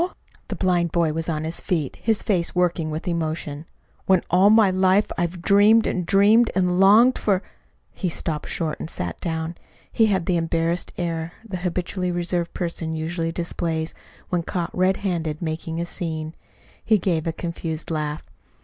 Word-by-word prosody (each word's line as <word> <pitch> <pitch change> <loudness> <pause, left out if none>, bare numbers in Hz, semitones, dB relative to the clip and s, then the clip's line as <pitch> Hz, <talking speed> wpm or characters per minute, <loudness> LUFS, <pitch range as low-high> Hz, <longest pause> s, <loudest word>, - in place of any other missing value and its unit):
The - - -4
blind 175 -3 +1
boy 165 -2 +1
was 165 +1 -3
on 155 -1 -1
his 160 +2 -4
feet, 155 -7 -2
his 220 -1 0
face 180 -6 0
working 175 -3 +1
with 155 +3 -5
emotion. 160 -2 -3 0.4
"When 190 -2 +4
all 185 +3 +6
my 215 -3 +6
life 185 +2 +3
I've 175 0 -2
dreamed 210 +4 +5
and 180 -3 -1
dreamed 210 +4 +5
and 180 -1 +2
longed 220 +6 +6
for 195 -2 +1 0.3
" - - -42
He 185 - +1
stopped 160 -2 -3
short 160 -3 -2
and - - -5
sat 85 - -5
down. 160 0 -3 0.4
He 225 - +3
had 190 -5 +1
the 180 -2 +1
embarrassed 165 +1 -1
air 165 -1 -3
the 190 -3 -4
habitually 180 +1 -2
reserved 175 0 -1
person 165 -2 -3
usually 165 +1 -2
displays 165 -1 -2 0.4
when 175 -1 0
caught 170 0 -4
red 185 +1 +2
handed 160 -5 -1
making 165 0 -4
a 170 - -1
"scene." 160 -3 -4 0.5
He 220 - +4
gave 170 -3 -1
a - - +1
confused 165 -1 -4
laugh. 150 -1 -2
170 Hz, 170 wpm, -23 LUFS, 160-185 Hz, 0.5 s, all